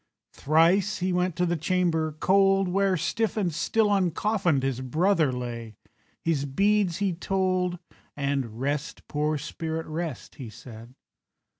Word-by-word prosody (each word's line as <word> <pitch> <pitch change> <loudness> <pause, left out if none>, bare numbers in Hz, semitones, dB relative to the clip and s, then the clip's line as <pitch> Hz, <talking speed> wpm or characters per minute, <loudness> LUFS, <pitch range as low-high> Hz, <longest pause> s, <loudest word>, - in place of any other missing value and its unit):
Thrice 175 +8 +3
he 185 0 -1
went 180 -1 0
to 180 - +1
the 175 0 0
chamber 160 -1 0
cold, 195 0 +4
Where, 190 +1 +2
stiff 225 +7 -1
and 180 -6 0
still 210 +7 +1
uncoffinèd, 190 -5 +1
His 135 -2 -1
brother 160 +3 +2
lay, 120 -3 -6 0.5
his 155 -4 0
beads 195 +4 +2
he 200 -2 0
told, 185 0 0 0.4
And 135 -5 -2
"Rest, 145 +2 -3
poor 150 +1 0
spirit, 160 +2 -4
rest," 155 -4 -5
he 120 - -6
said. 115 +2 -12
165 Hz, 135 wpm, -26 LUFS, 140-190 Hz, 0.5 s, cold